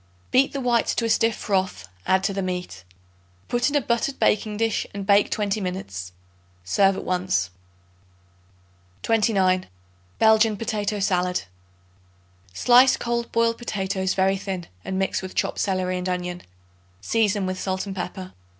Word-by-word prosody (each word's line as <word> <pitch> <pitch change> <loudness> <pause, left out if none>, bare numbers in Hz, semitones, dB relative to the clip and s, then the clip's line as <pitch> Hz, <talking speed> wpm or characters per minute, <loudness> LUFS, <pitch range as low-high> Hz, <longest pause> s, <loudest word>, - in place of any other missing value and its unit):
Beat 265 +2 +4
the 280 - -4
whites 240 -2 +1
to 230 - 0
a - - 0
stiff 225 0 +2
froth; 185 - -2 0.2
add 190 0 +3
to 195 - 0
the 195 - -2
meat. 180 - -4 0.6
Put 240 +3 +1
in 290 - -3
a 290 - +4
buttered 235 +3 -1
baking 210 0 +1
dish 225 0 0
and 200 -1 -4
bake 200 0 +4
twenty 210 0 -1
minutes. 95 - -5 0.5
Serve 195 - +3
at - - -5
once. 180 - 0 1.5
29. 195 -5 +2 0.5
Belgian 220 -1 +4
Potato 210 -1 -2
Salad. 180 -2 0 1.1
Slice 250 - +5
cold 235 0 -2
boiled 230 0 +1
potatoes 190 -4 -2
very 195 0 +2
thin 190 -3 -5 0.2
and 190 - -3
mix 190 0 0
with 185 -1 -8
chopped - - -1
celery 185 -2 0
and 180 +1 -3
onion; 180 0 -3 0.6
season 205 - +1
with 185 0 -3
salt 190 0 -2
and 195 -1 -6
pepper. 185 0 -6
195 Hz, 150 wpm, -24 LUFS, 185-225 Hz, 1.5 s, Slice